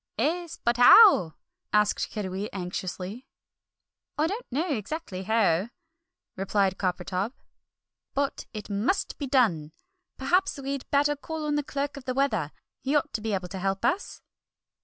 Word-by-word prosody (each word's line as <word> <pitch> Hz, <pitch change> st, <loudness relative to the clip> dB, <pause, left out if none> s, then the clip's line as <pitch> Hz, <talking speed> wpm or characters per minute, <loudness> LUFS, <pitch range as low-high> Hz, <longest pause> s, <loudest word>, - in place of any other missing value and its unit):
"'Es, 340 Hz, +1 st, -1 dB
but 235 Hz, 0 st, +2 dB
how?" 245 Hz, -, +8 dB, 0.4 s
asked 210 Hz, 0 st, +2 dB
Kiddiwee 200 Hz, -1 st, -4 dB
anxiously. 185 Hz, +5 st, -5 dB, 0.9 s
"I 305 Hz, -, +2 dB
don't 415 Hz, +9 st, -3 dB
know 305 Hz, +8 st, 0 dB
exactly 215 Hz, -, -5 dB
how," 205 Hz, -2 st, +2 dB, 0.7 s
replied 195 Hz, 0 st, 0 dB
Coppertop, 185 Hz, +4 st, -2 dB, 0.8 s
"but 280 Hz, 0 st, -1 dB
it 215 Hz, -2 st, -7 dB
must 210 Hz, -, -1 dB
be 285 Hz, -, -3 dB
done! 190 Hz, -, +2 dB, 0.4 s
Perhaps 360 Hz, +8 st, +1 dB
we'd 275 Hz, -1 st, -5 dB
better 290 Hz, +1 st, +3 dB
call 315 Hz, +2 st, -5 dB
on 300 Hz, -, 0 dB
the 295 Hz, -, +1 dB
Clerk 285 Hz, 0 st, -4 dB
of 270 Hz, -, -10 dB
the 255 Hz, -, -2 dB
Weather, 215 Hz, -, 0 dB, 0.3 s
he 275 Hz, +3 st, 0 dB
ought 295 Hz, +1 st, +1 dB
to 220 Hz, -, -2 dB
be 220 Hz, -1 st, -2 dB
able 180 Hz, -1 st, -4 dB
to 190 Hz, +1 st, -6 dB
help 195 Hz, +3 st, -1 dB
us!" 365 Hz, +11 st, -1 dB
235 Hz, 145 wpm, -27 LUFS, 195-285 Hz, 0.9 s, how